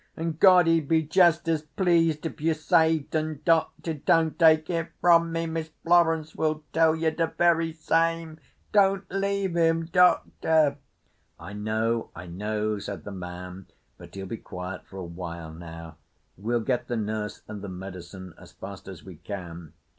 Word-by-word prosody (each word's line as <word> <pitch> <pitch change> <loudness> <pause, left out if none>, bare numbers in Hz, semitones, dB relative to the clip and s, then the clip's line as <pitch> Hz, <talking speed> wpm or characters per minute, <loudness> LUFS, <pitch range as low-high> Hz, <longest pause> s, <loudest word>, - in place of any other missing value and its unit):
An' 165 +1 -2
God 180 +2 +6
he'd 165 -3 +2
be 160 0 +3
just 170 +1 +3
as 160 -2 +1
pleased 165 0 +1
if 160 - -5
you 160 0 +1
saved 160 0 +2
'un, 155 -2 -1
Doctor. 165 0 +1
Don't 160 +2 +1
take 160 -2 +5
it 165 -2 -2
from 170 -1 +4
me. 165 0 -1
Miss 160 -1 -4
Florence 165 -2 +3
will 155 -1 -1
tell 160 0 +4
ye 160 0 0
de 165 +1 0
very 165 -1 +2
same. 165 0 0 0.3
Don't 195 -1 +3
leave 195 -1 -1
'im, 165 -1 +2
Doctor!" 160 -3 +3 0.6
"I 90 +5 -9
know. 110 +2 -1
I 85 - -8
know," 105 +4 -2
said 100 0 -7
the 100 - -7
man, 90 0 -8 0.3
"but - - -13
he'll 95 0 -6
be 110 +4 -5
quiet 90 -1 -8
for 95 - -11
a 95 - -5
while 85 -2 -7
now. 80 -1 -10 0.4
We'll 115 +5 -1
get 120 +1 -1
the 120 - -2
nurse 105 -1 -4
and 105 -2 -7
the 100 - -6
medicine 95 -1 -9
as - - -15
fast 95 0 -10
as 95 -3 -9
we 95 -4 -11
can." 85 -3 -8
155 Hz, 170 wpm, -26 LUFS, -, 0.6 s, God